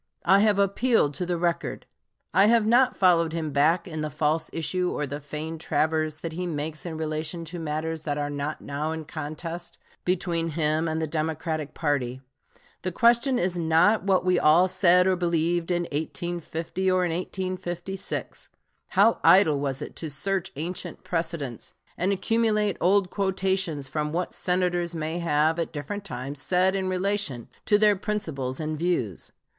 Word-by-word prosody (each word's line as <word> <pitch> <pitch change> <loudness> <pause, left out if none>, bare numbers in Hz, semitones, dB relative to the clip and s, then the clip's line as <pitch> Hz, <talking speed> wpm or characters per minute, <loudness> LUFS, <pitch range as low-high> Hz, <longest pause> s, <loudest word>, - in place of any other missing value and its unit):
I 190 +3 +6
have 210 -1 +3
appealed 200 - +2
to 180 +4 -3
the 175 -1 0
record. 170 0 -2 0.5
I 195 +4 +6
have 230 -1 +4
not 245 +3 +4
followed 170 -4 +3
him 160 -2 -2
back 155 +6 +2
in 155 -3 -5
the 155 - -2
false 155 +2 0
issue 180 +2 -1
or 150 - -2
the 145 +1 -5
feigned 155 +2 -6
traverse 155 0 0
that 165 -1 -4
he 180 +2 -3
makes 155 +1 -4
in 160 -2 -5
relation 160 +2 -3
to 170 +2 -6
matters 160 0 -3
that 150 -2 -2
are 145 0 -2
not 145 +2 -4
now 150 +3 -3
in 160 -1 -6
contest 165 +3 -6 0.3
between 175 -2 0
him 155 +1 +1
and 160 0 -1
the 160 - 0
Democratic 155 -1 -3
party. 130 -5 -1 0.6
The 185 - -2
question 240 +6 +3
is 180 -2 0
not 165 +6 +4
what 190 -1 +2
we 180 -1 +3
all 165 +5 +5
said 180 -1 +4
or 190 0 +3
believed 170 -1 0
in 175 -1 +1
1850 170 +3 -3
or 185 -1 +2
in 175 - -1
1856. 185 +1 -4 0.4
How 210 +4 +3
idle 160 -7 +6
was 135 -2 -2
it - - -9
to 160 - -4
search 190 +6 -1
ancient 175 +5 -5
precedents 165 -8 -3 0.2
and 185 +3 0
accumulate 210 +1 +1
old 190 +1 +3
quotations 190 -6 -1
from 150 +2 -2
what 175 +3 -2
Senators 175 -1 0
may 160 +2 -3
have 160 0 +2
at 165 - -2
different 165 +7 -5
times 140 -3 -5
said 185 +3 +2
in 190 -1 -1
relation 185 - -1 0.2
to 205 - +5
their 210 -1 +4
principles 160 - -3
and 155 0 -2
views. 160 - -1
170 Hz, 165 wpm, -26 LUFS, 155-185 Hz, 0.6 s, I